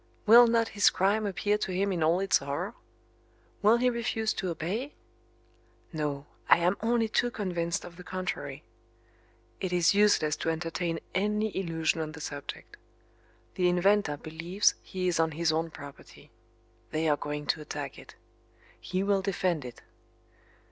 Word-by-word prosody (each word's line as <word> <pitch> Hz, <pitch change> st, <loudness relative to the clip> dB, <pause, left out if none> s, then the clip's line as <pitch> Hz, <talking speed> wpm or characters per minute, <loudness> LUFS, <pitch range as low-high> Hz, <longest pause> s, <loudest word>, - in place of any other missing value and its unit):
Will 235 Hz, +2 st, +9 dB
not 230 Hz, -1 st, +2 dB
his 205 Hz, -, +4 dB
crime 205 Hz, +3 st, +1 dB
appear 205 Hz, +2 st, 0 dB
to 190 Hz, -, -2 dB
him 195 Hz, +2 st, 0 dB
in 175 Hz, -3 st, -2 dB
all 165 Hz, +3 st, +3 dB
its 195 Hz, 0 st, +3 dB
horror? 145 Hz, +10 st, -4 dB, 0.9 s
Will 215 Hz, +3 st, +5 dB
he 250 Hz, +1 st, +2 dB
refuse 225 Hz, -2 st, 0 dB
to 185 Hz, -, -3 dB
obey? 200 Hz, -, -3 dB, 1.0 s
No, 145 Hz, -2 st, -3 dB, 0.2 s
I -, -, +8 dB
am 175 Hz, +3 st, +2 dB
only 230 Hz, 0 st, +2 dB
too 240 Hz, +2 st, +1 dB
convinced 175 Hz, -6 st, -2 dB
of 170 Hz, -1 st, -11 dB
the 180 Hz, -, -10 dB
contrary. 185 Hz, 0 st, -5 dB, 1.0 s
It 185 Hz, -, -3 dB
is 175 Hz, 0 st, +4 dB
useless 200 Hz, -7 st, +3 dB
to -, -, -2 dB
entertain 165 Hz, +1 st, -2 dB
any 210 Hz, +2 st, 0 dB
illusion 165 Hz, -3 st, 0 dB
on 155 Hz, 0 st, -5 dB
the 160 Hz, -, -9 dB
subject. 145 Hz, -2 st, -7 dB, 0.8 s
The 180 Hz, -1 st, +2 dB
inventor 180 Hz, -3 st, +2 dB
believes 165 Hz, +6 st, 0 dB
he 185 Hz, -2 st, -3 dB
is 175 Hz, -2 st, +1 dB
on 160 Hz, -1 st, +2 dB
his 165 Hz, +1 st, +1 dB
own 165 Hz, +1 st, -1 dB
property. 140 Hz, -3 st, -13 dB, 0.6 s
They 160 Hz, +1 st, -1 dB
are 150 Hz, -, +4 dB
going 150 Hz, +1 st, -5 dB
to 155 Hz, -, 0 dB
attack 145 Hz, -2 st, -6 dB
it. -, -, -14 dB, 0.6 s
He 185 Hz, +1 st, -2 dB
will 200 Hz, -1 st, +2 dB
defend 185 Hz, -5 st, -1 dB
it. 125 Hz, -1 st, -10 dB
180 Hz, 155 wpm, -29 LUFS, 160-205 Hz, 1.0 s, Will